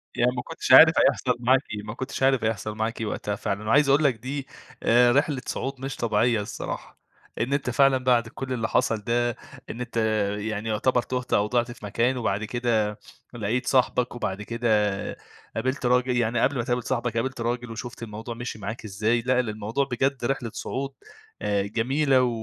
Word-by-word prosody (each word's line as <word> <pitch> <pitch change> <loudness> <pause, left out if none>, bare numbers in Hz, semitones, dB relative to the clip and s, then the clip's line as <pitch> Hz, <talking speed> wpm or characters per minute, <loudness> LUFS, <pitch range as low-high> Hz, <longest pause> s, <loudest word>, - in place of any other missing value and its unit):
يعني 125 +1 +3
ما 125 - -2
كنتش 160 -1 -4
عارف 160 +5 +10
هيحصل 125 -2 +3
معاك 130 +2 +4
إيه، 105 - -5
ما 105 +1 -6
كنتش 130 +2 -4
عارف 135 -3 +3
هيحصل 110 -1 -2
معاك 110 +1 -2
إيه - - -1
وقتها 105 0 -3
فعلًا، 105 +2 -3
وعايز 140 +4 +4
أقول 145 +3 +4
لك 135 -5 +3
دي 135 +4 -5 0.4
آآ، 120 +1 +5
رحلة 140 0 +1
صعود 135 0 -4
مش 135 0 -4
طبيعية 115 -1 +1
الصراحة، 100 - -6 0.4
إن 130 +4 0
أنت 140 -3 0
فعلًا 135 +2 +4
بعد 125 -2 +2
كل 130 +2 -5
اللي 115 -2 -1
حصل 115 - +1
ده 120 +3 0 0.4
إن 120 - -6
أنت، 125 -2 -5 0.4
يعني 110 +1 -3
يعتبر 125 +3 +2
تُهت 125 0 -4
أو 105 +1 +3
ضِعت 120 +1 0
في 115 - -10
مكان 120 +5 +1
وبعد 105 -3 -1
كده 110 -2 0 0.3
لَقيت 120 +2 -1
صاحبك، 125 -2 +2
وبعد 100 -4 -3
كده 115 +2 -3 0.9
قابلت 130 +3 -2
راجل 125 0 +2
يعني 120 0 +1
قبل 135 +1 +2
ما 120 - 0
تقابل 120 0 -1
صاحبك 120 -2 -1
قابلت 130 +1 -2
راجل 120 0 -2
وشُفت 115 +1 -7
الموضوع 110 +2 -6
مشّي 120 -2 -6
معاك 110 +3 -6
إزاي، 110 +4 0
لأ 125 +1 +2
ال 125 -3 0
الموضوع 110 +6 -1
بجد 130 0 0
رحلة 125 -3 -2
صعود 135 +1 -4 0.5
آآ 100 -1 +1
جميلة 130 +6 +2
و 125 - +2
120 Hz, 190 wpm, -25 LUFS, 110-130 Hz, 0.9 s, عارف